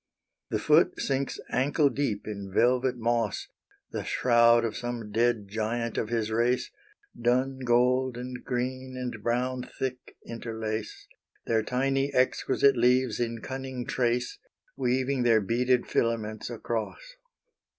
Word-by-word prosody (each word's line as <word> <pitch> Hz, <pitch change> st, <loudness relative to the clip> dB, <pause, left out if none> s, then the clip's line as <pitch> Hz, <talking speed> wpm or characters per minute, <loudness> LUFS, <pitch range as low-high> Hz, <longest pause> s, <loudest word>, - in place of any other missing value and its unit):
The -, -, 0 dB
foot -, -, +3 dB
sinks 135 Hz, 0 st, -1 dB
ankle 140 Hz, +4 st, +2 dB
deep 120 Hz, -6 st, -2 dB
in 100 Hz, -2 st, -6 dB
velvet 125 Hz, +4 st, +2 dB
moss, 115 Hz, -2 st, -1 dB, 0.4 s
The -, -, -3 dB
shroud 120 Hz, -1 st, +4 dB
of 110 Hz, -, -3 dB
some 120 Hz, -3 st, -5 dB
dead 115 Hz, -1 st, +1 dB
giant 115 Hz, +3 st, -2 dB
of 110 Hz, -, -1 dB
his 115 Hz, -2 st, -1 dB
race; 120 Hz, +3 st, +1 dB, 0.4 s
Dun 130 Hz, +3 st, +1 dB
gold 125 Hz, +1 st, +2 dB
and 125 Hz, 0 st, -6 dB
green 130 Hz, +1 st, -3 dB
and 125 Hz, -3 st, -5 dB
brown 125 Hz, +3 st, 0 dB, 0.2 s
thick 130 Hz, -1 st, -5 dB
interlace, 110 Hz, -2 st, -5 dB, 0.4 s
Their 110 Hz, -1 st, +2 dB
tiny 135 Hz, +4 st, 0 dB
exquisite 130 Hz, +1 st, +3 dB
leaves 125 Hz, -1 st, +2 dB
in 115 Hz, -1 st, -2 dB
cunning 130 Hz, -2 st, -5 dB
trace, 125 Hz, 0 st, -1 dB, 0.4 s
Weaving 130 Hz, +1 st, 0 dB
their 115 Hz, -2 st, +5 dB
beaded 120 Hz, +4 st, +1 dB
filaments 110 Hz, -2 st, -1 dB
across. 120 Hz, -, -5 dB
120 Hz, 125 wpm, -28 LUFS, 115-130 Hz, 0.4 s, their